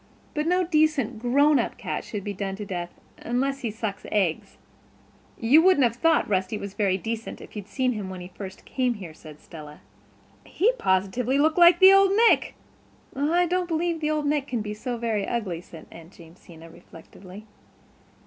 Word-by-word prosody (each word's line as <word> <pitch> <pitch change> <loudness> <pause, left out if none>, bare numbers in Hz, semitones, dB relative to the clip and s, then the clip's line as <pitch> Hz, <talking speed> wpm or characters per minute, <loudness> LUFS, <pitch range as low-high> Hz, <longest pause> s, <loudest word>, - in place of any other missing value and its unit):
But 300 0 -2
no 360 +1 +2
decent, 310 -9 +1
grown 280 +5 +3
up - - -3
cat - - -4
should 205 -3 -6
be 205 - -4
done 195 0 -4
to 210 +1 -7
death—unless 235 +9 -4
he 240 -4 -3
sucks 210 -2 -5
eggs." 190 -6 -1 0.8
"You 260 +8 +5
wouldn't 365 -5 +4
have 235 -1 +1
thought 330 +3 +2
Rusty 190 +1 -1
very 200 -1 -1
decent 225 +3 -5
if - - -14
you'd 205 -2 -7
seen 255 +4 -1
him 210 -5 -5
when 185 -1 -7
he 180 +1 -10 0.3
came 255 -2 -1
here," 180 -6 -9
said 155 -1 -14
Stella. 150 -2 -12 0.6
"He 425 +7 +1
positively 200 +8 0
looked 310 +4 +2
like 345 0 +7
the 380 0 +8
Old 390 0 +5 0.2
Nick." - - +1 0.6
"I 320 +6 +1
don't 360 +1 -1
believe 330 -1 -2
Old 305 -1 0
Nick 290 -1 0
can 240 -3 -3
be 210 0 -5
so 240 +3 -5
very, 225 -4 -2
ugly" 195 -8 -3
said 165 -2 -13
Aunt 165 +2 -14
Jamesina 165 -1 -15
reflectively. 185 +5 -14
230 Hz, 170 wpm, -25 LUFS, 190-300 Hz, 0.8 s, the